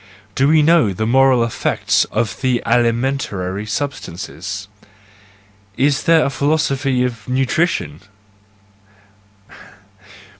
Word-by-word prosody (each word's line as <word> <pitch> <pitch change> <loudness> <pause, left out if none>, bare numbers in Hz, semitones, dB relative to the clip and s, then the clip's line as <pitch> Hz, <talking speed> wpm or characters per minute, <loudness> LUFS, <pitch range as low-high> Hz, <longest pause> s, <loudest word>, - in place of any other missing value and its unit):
Do 135 +6 +2
we 155 0 +4
know 155 - +3
the 110 +4 -3
moral 130 0 +4
effects 115 - 0
of 110 -3 -3
the 130 -2 0
alimentary 115 -5 -1
substances? 100 - -5 1.1
Is 140 +3 +1
there 165 -2 +4
a 140 - -1
philosophy 140 -3 0
of 115 -4 -4
nutrition? 130 - -1
130 Hz, 90 wpm, -18 LUFS, 110-140 Hz, 1.1 s, we